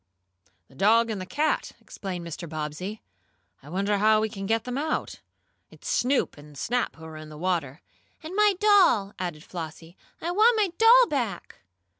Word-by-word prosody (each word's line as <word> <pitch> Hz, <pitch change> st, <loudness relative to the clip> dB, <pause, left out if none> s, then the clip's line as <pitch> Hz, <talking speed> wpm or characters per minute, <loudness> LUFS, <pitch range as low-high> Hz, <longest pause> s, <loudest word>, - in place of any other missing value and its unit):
"The -, -, -21 dB
dog 225 Hz, +9 st, +3 dB
and 205 Hz, -3 st, -4 dB
the 185 Hz, -, -7 dB
cat," 305 Hz, +7 st, -1 dB
explained 180 Hz, -3 st, -7 dB
Mr. 170 Hz, 0 st, -7 dB
Bobbsey. 155 Hz, +7 st, -5 dB, 0.6 s
"I 140 Hz, -, -14 dB
wonder 200 Hz, +4 st, 0 dB
how 215 Hz, +1 st, +4 dB
we 220 Hz, 0 st, 0 dB
can 195 Hz, -1 st, -6 dB
get 225 Hz, +1 st, +1 dB
them 250 Hz, 0 st, -5 dB
out? 310 Hz, +2 st, -3 dB, 0.5 s
It's -, -, -13 dB
Snoop 260 Hz, -, +1 dB
and 145 Hz, -1 st, -14 dB
Snap 245 Hz, -, -1 dB
who 160 Hz, -, -12 dB
are 160 Hz, -1 st, -9 dB
in 155 Hz, 0 st, -10 dB
the 155 Hz, -, -10 dB
water." 165 Hz, -4 st, -2 dB, 0.4 s
"And 325 Hz, +4 st, -7 dB
my 420 Hz, -1 st, +4 dB
doll!" 380 Hz, -, +4 dB
added 175 Hz, -4 st, -4 dB
Flossie. 165 Hz, 0 st, -8 dB, 0.2 s
"I 340 Hz, -, -3 dB
want 445 Hz, +5 st, +4 dB
my 415 Hz, -3 st, +2 dB
doll 475 Hz, +2 st, +7 dB
back!" 250 Hz, -, -3 dB
200 Hz, 175 wpm, -26 LUFS, -, 0.6 s, doll